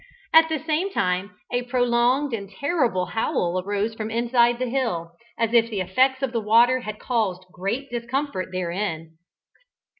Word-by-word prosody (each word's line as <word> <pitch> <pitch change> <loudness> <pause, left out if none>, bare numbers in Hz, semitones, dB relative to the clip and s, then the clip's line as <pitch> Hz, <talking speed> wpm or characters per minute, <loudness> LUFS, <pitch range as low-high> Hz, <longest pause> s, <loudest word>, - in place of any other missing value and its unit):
At 320 0 +7
the 320 - 0
same 315 +5 -1
moment 180 +1 0 0.2
a 245 - +1
prolonged 245 +2 +1
and 200 -3 -4
terrible 240 - 0
howl 185 -5 -1
arose 205 +3 -1
from 220 -1 -5
inside 235 +1 +2
the 255 - -1
hill, 230 -10 -2 0.3
as 230 -1 0
if 230 -1 +4
the 210 -4 -3
effects 260 +9 +2
of 265 - 0
the 230 -2 -1
water 235 +4 +4
had 215 -3 -6
caused 210 -7 -1
great 225 +10 -4
discomfort 240 -3 -3
therein. 170 -3 -4
230 Hz, 155 wpm, -24 LUFS, 190-255 Hz, 0.3 s, At